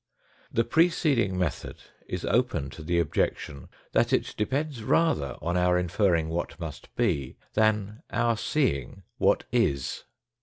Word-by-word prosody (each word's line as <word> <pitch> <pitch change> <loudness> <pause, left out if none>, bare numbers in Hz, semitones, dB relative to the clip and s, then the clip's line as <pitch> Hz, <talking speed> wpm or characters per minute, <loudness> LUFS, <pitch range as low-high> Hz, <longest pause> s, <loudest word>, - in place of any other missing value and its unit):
The 115 - +2
preceding 140 - +2
method 90 -5 -2 0.3
is - - -4
open 70 -1 +1
to 70 - -10
the 85 +3 0
objection 70 -3 -1 0.2
that - - +2
it - - +1
depends 135 +4 -1
rather 110 - +1
on 85 +2 0
our 90 0 +3
inferring 90 -2 +2
what 85 +2 -3
must 80 -4 -7
be, 85 - 0 0.2
than 110 0 +1
our 120 -1 +1
seeing 95 - -1 0.2
what - - +3
is. 70 -1 0
95 Hz, 130 wpm, -27 LUFS, 80-115 Hz, 0.3 s, our